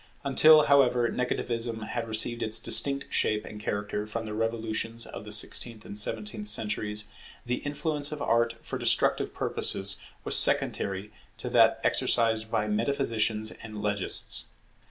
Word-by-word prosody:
Until, 155 +3 +6
however, 125 -4 +3
Negativism 115 -2 -3
had 115 -1 -4
received 115 +2 +2
its 110 0 +2
distinct 140 +5 +3
shape 105 0 0
and 105 - -10
character 105 0 -4
from 115 +1 -5
the 105 - -6
revolutions 115 +1 -3
of 100 - -9
the 105 - -9
sixteenth 110 +1 0
and - - -9
seventeenth 105 0 -3
centuries, 105 0 +1 0.4
the 125 +1 -2
influence 145 0 -1
of 150 - -6
Art 115 -3 +1
for - - -5
destructive - - +1
purposes 100 0 +1 0.2
was - - -1
secondary 100 +2 +2 0.3
to - - -6
that - - +4
exercised 110 -2 +1
by 105 -1 -1
metaphysicians 110 -1 -1
and 110 -1 -10
legists. 105 -2 -1
110 Hz, 140 wpm, -27 LUFS, 105-120 Hz, 0.4 s, Until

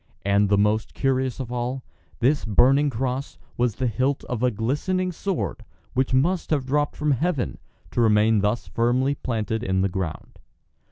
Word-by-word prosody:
And 100 0 +3
the 100 - +4
most 105 +1 +1
curious 130 -2 0
of 125 -3 -5
all, 125 +2 -3 0.4
this 140 +5 +2
burning 135 +7 +4
cross 130 +2 -3 0.2
was 120 -4 0
the 130 - -2
hilt 130 +4 0
of 125 -3 -4
a 125 - +4
glistening 150 - -1
sword 165 - -3 0.3
which 130 +1 +1
must 165 +8 +1
have 145 -4 +1
dropped 145 +2 0
from 150 0 0
heaven, 140 0 -1 0.3
to 120 - 0
remain 110 -1 +4
thus 105 +4 0
firmly 125 +4 +1
planted 110 -5 -2
in 95 0 0
the 95 - +1
ground. 90 -4 -5
125 Hz, 165 wpm, -24 LUFS, 110-140 Hz, 0.4 s, the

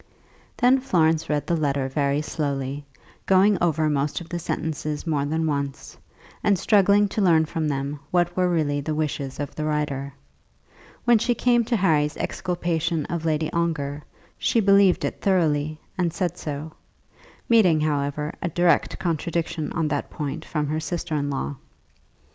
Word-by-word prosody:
Then 255 +2 +4
Florence 165 -11 +1
read 150 -1 0
the 170 - +1
letter 140 -4 0
very 140 +2 0
slowly, 140 -2 -3 0.4
going 195 +2 +5
over 160 -2 +2
most 145 -1 0
of 175 - -11
the 175 - -3
sentences 155 -2 -3
more 150 -4 0
than 160 +2 -1
once, 140 -3 -3 0.5
and 200 -2 +3
struggling 205 +1 +4
to 210 - -2
learn 165 -4 +4
from 155 0 -2
them 140 0 -2
what 175 -1 +1
were 185 -1 +2
really 150 -4 0
the 155 +2 -3
wishes 140 -3 -3
of 145 -1 -4
the 155 - -4
writer. 150 -2 -2 0.9
When 240 -2 +5
she 240 +2 +1
came 240 -1 +3
to 235 - 0
Harry's 155 -6 +2
exculpation 170 -3 -1
of 170 -1 -3
Lady 155 0 0
Ongar, 155 -4 -1 0.4
she 230 - +2
believed 200 -2 +4
it - - -4
thoroughly, 155 -5 +1 0.2
and 175 -2 +1
said 175 0 -2
so, 150 0 -6 0.7
meeting, 185 -10 +4
however, 150 0 -1
a 170 - -1
direct 170 -1 +2
contradiction 165 -2 -2
on 165 -2 0
that 145 -1 -2
point 145 -2 -4
from 150 -2 -2
her 155 +2 -1
sister 170 +1 -4
in 145 -1 0
law. 140 0 -3
155 Hz, 160 wpm, -24 LUFS, 145-175 Hz, 0.9 s, going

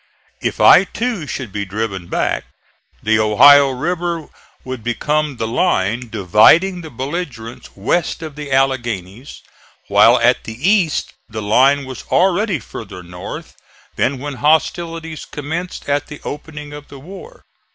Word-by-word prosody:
If - - -2
I - - +8
too 225 -6 -3
should 125 -7 -5
be 100 +1 -3
driven 100 -2 -4
back, - - -1 0.6
the 110 0 +2
Ohio 140 +7 +7
River 170 +4 -3 0.3
would 130 -3 -6
become 150 +4 -1
the 115 - -2
line 115 - 0
dividing 110 - +4
the 160 - -9
belligerents 130 -3 -6
west 165 - -1
of 155 -3 -7
the 145 -2 -7
Alleghanies, 120 -4 -2 0.5
while 105 +5 +6
at 120 +1 +2
the 110 0 -7
East 195 -7 +1 0.2
the 110 -1 -5
line 135 +7 +3
was 130 -1 -8
already 190 +1 +2
farther 95 -8 -9
north 90 0 -8 0.4
than 135 +1 0
when 140 +1 -6
hostilities 160 +2 0
commenced 160 +5 -6
at 145 0 0
the 150 - -9
opening 150 0 -7
of 145 0 -10
the 140 - -12
war. 195 - -12
140 Hz, 140 wpm, -18 LUFS, 115-160 Hz, 0.6 s, I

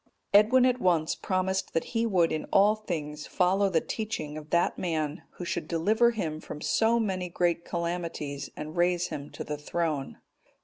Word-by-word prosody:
Edwin 225 +5 +6
at 250 -1 +2
once 165 -4 +2
promised 190 0 -1
that 165 - +2
he 230 0 +1
would 180 -6 +3
in 155 - -2
all 205 +2 +4
things 155 -8 -5
follow 190 +2 +2
the 165 -4 +2
teaching 215 -9 -4
of 155 0 -8
that 170 +1 +2
man 155 -2 -2
who 175 - -7
should 175 - -3
deliver 215 +8 +3
him 165 -10 -3
from 150 - -8
so 230 +8 +2
many 185 -5 -1
great 170 0 0
calamities, 170 -5 -3
and 155 +1 -6
raise 175 0 +2
him 145 0 -6
to 150 - -6
a - - -3
throne. 150 -2 -2
175 Hz, 175 wpm, -28 LUFS, 155-200 Hz, -, Edwin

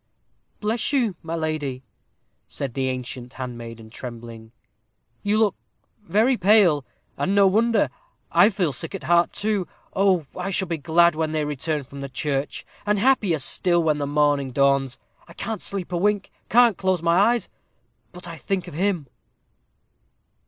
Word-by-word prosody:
"Bless 220 +4 0
you, 240 -9 +1
my 165 0 -4
lady," 155 -5 -3 0.6
said 135 -4 -4
the 130 0 -1
ancient 125 0 -6
handmaiden, 115 -3 -8
trembling, 115 -2 -9 0.7
"you 205 +1 +1
look 215 -3 +3 0.5
very 220 +5 +2
pale, 185 -7 +5 0.3
and 195 - 0
no 200 -1 +6
wonder. 220 +3 +3 0.4
I - - +6
feel 185 -7 0
sick 160 - -5
at 195 - -7
heart, 175 0 +3
too. 205 -3 -1 0.3
Oh! 190 -4 +3
I 180 +1 -3
shall 190 0 -1
be 165 -2 -3
glad 170 +2 +4
when 155 0 -2
they 155 -1 0
return 150 +1 -2
from 140 +1 -10
the 140 - -5
church, 140 +1 -3 0.2
and 210 0 +1
happier 205 -7 +3
still 175 +5 +2
when 155 -2 +1
the 145 - -2
morning 145 -2 +2
dawns. 140 0 +2 0.3
I 170 - -13
can't 220 +4 -4
sleep 195 -2 -4
a 175 - 0
wink 205 +2 0 0.2
can't 235 -3 +5
close 185 -3 0
my 170 +1 +3 0.2
eyes, 240 - -4 0.6
but 180 -1 -9
I 165 -1 -7
think 185 +1 -2
of 175 - -9
him." 180 -1 0
170 Hz, 160 wpm, -23 LUFS, 140-200 Hz, 0.7 s, no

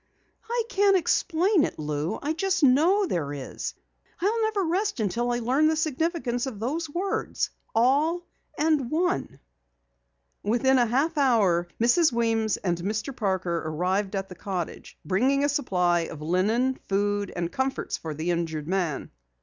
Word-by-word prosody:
"I 475 0 0
can't 400 -2 +4
explain 345 +1 +2
it, - - -2
Lou. 150 +5 -2
I 300 +2 0
just 375 +1 0
know 325 +10 +5
there 160 - -2
is. 140 -2 -5 0.4
I'll 425 +6 +1
never 435 -3 +1
rest 375 - 0
until 230 +4 0
I 240 - +1
learn 260 +6 +2
the 315 - +2
significance 310 -5 -1
of 225 -6 -6
those 300 +8 -2
words, 365 +6 -2 0.2
All 295 +9 +2 0.3
and 300 -5 +1
One." 355 +5 -1 1.0
Within 255 +5 +3
a 240 - +3
half 290 +7 +1
hour 200 -10 +3
Mrs. 255 +8 +4
Weems 225 -3 +1
and 175 -3 -1
Mr. 210 +8 -3
Parker 185 -6 -1
arrived 185 +6 -1
at 195 0 -2
the 185 - -9
cottage, 180 -2 -5
bringing 260 - +2
a 290 - +2
supply 180 -12 +1
of 165 -2 -5
linen, 210 +11 +1
food, 205 0 0
and 175 -1 -2
comforts 265 0 -2
for 155 -2 -6
the 160 +4 -1
injured 160 -3 -2
man. 175 -6 -2
240 Hz, 150 wpm, -26 LUFS, -, 1.0 s, know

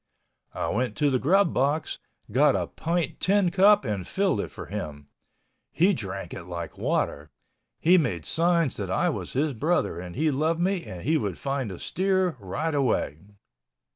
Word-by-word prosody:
I - - -2
went 125 +3 -1
to 145 -2 +2
the 130 - +2
grub 190 +6 +3
box, 145 +4 0 0.3
got - - +4
a - - 0
pint 165 -2 -2
tin 195 -2 +2
cup 200 +3 +5
and 100 -5 -3
filled 190 - +1
it - - -5
for - - -9
him. 75 -1 -6 0.6
He 185 +5 +3
drank 95 - -5
it 85 - -7
like 85 -1 -6
water. 75 +2 -1 0.5
He 180 +3 +5
made 95 - -2
signs 170 -3 +1
that 100 -3 -4
I 95 - +1
was - - -4
his 145 +2 +1
brother 150 - 0
and 90 -1 -8
he 155 +4 +2
loved 155 +4 0
me 185 0 0
and 90 -2 -8
he 160 +2 +2
would 100 - -3
find 135 -4 -2
the 95 - -7
steer 185 - 0
right 110 - -3
away. 125 - 0
145 Hz, 175 wpm, -26 LUFS, -, 0.6 s, cup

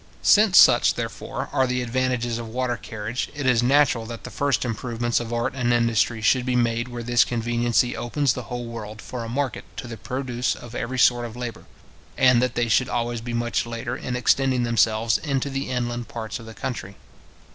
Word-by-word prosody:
Since 210 -3 +5
such, - - +7
therefore, - - -5
are 130 - +2
the 125 0 -1
advantages 120 -1 -1
of 115 - -6
water 125 +2 -1
carriage, 110 +2 -5
it 145 -1 -4
is 125 -3 +4
natural 125 -3 +3
that 115 0 -8
the - - -8
first 140 -2 0
improvements 120 0 -1
of 120 -1 -6
art 120 +2 -1
and 125 -2 0
industry 115 -1 +1
should 130 +2 +3
be 125 0 -1
made 120 0 +1
where 120 -1 -6
this 120 0 +4
conveniency 120 +1 0
opens 135 +2 0
the 125 - -5
whole 120 0 -4
world 110 -2 -7
for 120 0 -6
a 115 - -6
market 135 +2 -2
to - - -5
the 115 -1 -7
produce 125 +2 -2
of 120 -1 -11
every 120 +2 -3
sort 120 -1 +4
of 115 - -11
labour, 120 -2 -6 0.5
and 125 -2 +5
that 125 -1 0
they 120 -1 +1
should 125 +3 +2
always 120 -1 -2
be 120 0 -4
much 120 0 -1
later 115 -1 -4
in 125 - -4
extending 130 0 +2
themselves 115 -1 +2
into 140 -2 -2
the 135 0 -3
inland 120 -1 -2
parts 110 0 -5
of 115 - -11
the 110 - -10
country. 100 -6 -5
120 Hz, 200 wpm, -24 LUFS, 115-125 Hz, 0.5 s, such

